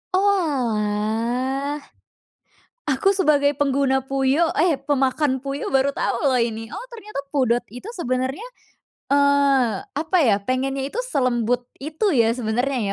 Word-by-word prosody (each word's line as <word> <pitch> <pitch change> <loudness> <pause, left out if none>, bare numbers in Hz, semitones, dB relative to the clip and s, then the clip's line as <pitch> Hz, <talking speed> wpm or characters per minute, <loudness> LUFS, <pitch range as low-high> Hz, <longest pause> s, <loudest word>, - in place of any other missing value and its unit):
Oalah. 255 - 0 1.0
Aku 295 +6 +2
sebagai 290 -6 +2
pengguna 270 -2 +1
Puyo, 275 +5 +1
eh 320 -2 +2
pemakan 275 -1 0
Puyo 275 +1 -4
baru 270 +1 +3
tau - - -1
loh 255 - +2
ini. 225 -1 -2
Oh - - -7
ternyata 425 -8 -7
pudot 245 -4 +2
itu 250 - -8
sebenernya, 260 - -2 0.6
eee, 280 -6 +3 0.2
apa 320 +5 0
ya, 230 -9 +4
pengennya 265 +2 -1
itu 485 - -1
selembut 245 - 0 0.2
itu 320 +8 -1
ya 230 -3 +3
sebenernya 250 +3 -1
270 Hz, 120 wpm, -22 LUFS, 245-290 Hz, 1.0 s, ya